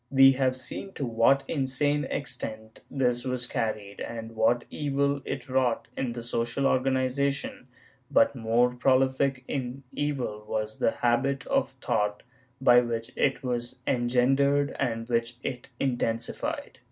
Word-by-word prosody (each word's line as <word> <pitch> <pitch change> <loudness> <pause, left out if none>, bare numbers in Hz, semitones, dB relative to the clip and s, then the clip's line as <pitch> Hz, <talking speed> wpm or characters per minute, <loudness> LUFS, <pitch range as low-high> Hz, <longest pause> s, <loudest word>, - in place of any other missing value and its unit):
We 135 0 +7
have 130 -1 +1
seen 160 +9 -4
to 140 - -3
what 120 +4 +3
insane 145 +1 +1
extent 110 -6 -5
this 125 -3 0
was 125 -2 -2
carried 110 -5 -3
and 115 -1 -6
what 120 +2 +2
evil 140 -1 0
it 135 0 -4
wrought 130 -3 0
in 125 -3 -2
the 120 -1 -6
social 120 +3 -1
organization, 135 +1 0 0.4
but - - +4
more 120 +2 +2
prolific 130 +1 +2
in 135 -1 -4
evil 130 -8 -2
was 110 0 -3
the - - +3
habit 135 +4 0
of - - +1
thought 105 0 -1 0.4
by 125 -2 +6
which 115 0 -3
it 135 - +1
was 120 0 -3
engendered 135 +3 +2
and 115 -1 -1
which 115 0 0
it 125 -2 -5
intensified. 120 -3 -2
125 Hz, 135 wpm, -27 LUFS, 115-135 Hz, 0.4 s, We